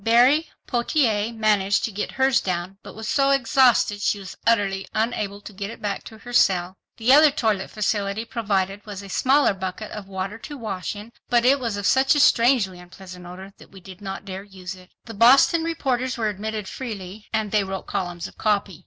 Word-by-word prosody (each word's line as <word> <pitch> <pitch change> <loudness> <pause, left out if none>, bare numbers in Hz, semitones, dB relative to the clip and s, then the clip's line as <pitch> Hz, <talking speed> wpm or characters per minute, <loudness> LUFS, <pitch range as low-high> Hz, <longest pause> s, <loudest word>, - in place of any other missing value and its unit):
Berry 250 +8 +4 0.2
Pottier 235 -4 +1
managed 210 -3 +1
to 225 - -4
get 210 +1 -4
hers 265 -1 +3
down, 185 +1 -4
but - - -12
was 220 0 -7
so 275 +3 +2
exhausted 255 -6 +3
she 210 - +1
was 195 -2 -9
utterly 200 -4 +1
unable 215 -3 -1
to 210 - -11
get 200 +1 -5
it 230 - -9
back 200 -1 -3
to 220 - -11
her 245 +2 -11
cell. 185 -4 +3 0.2
"The 240 +3 +4
other 300 +2 +8
toilet 220 -8 -1
facility 210 0 -2
provided 200 -4 -2
was 200 -2 -8
a 200 - -10
smaller 270 +5 +3
bucket 190 +2 -6
of 205 -2 -8
water 195 +3 -5
to 290 +5 -8
wash 210 -5 -4
in, 210 +3 -10 0.2
but 240 0 +3
it 275 +2 +5
was 230 -5 -3
of 205 - -4
such 265 +6 +4
a - - +2
strangely 235 -8 +3
unpleasant 180 0 -12
odor 190 +2 -10
that - - -16
we 195 - -13
did 185 +1 -13
not 195 0 -6
dare 190 -1 -6
use 190 -2 -9
it." 185 -1 -16 0.2
The 225 - -8
Boston 270 - +5
reporters 260 -6 -1
were 220 -2 0
admitted 210 0 -4
freely—and 215 -2 -5
they 210 -2 +2
wrote 190 0 -5
columns 175 -2 -4
of - - -11
copy. 200 -4 0
210 Hz, 200 wpm, -23 LUFS, 195-240 Hz, 0.2 s, other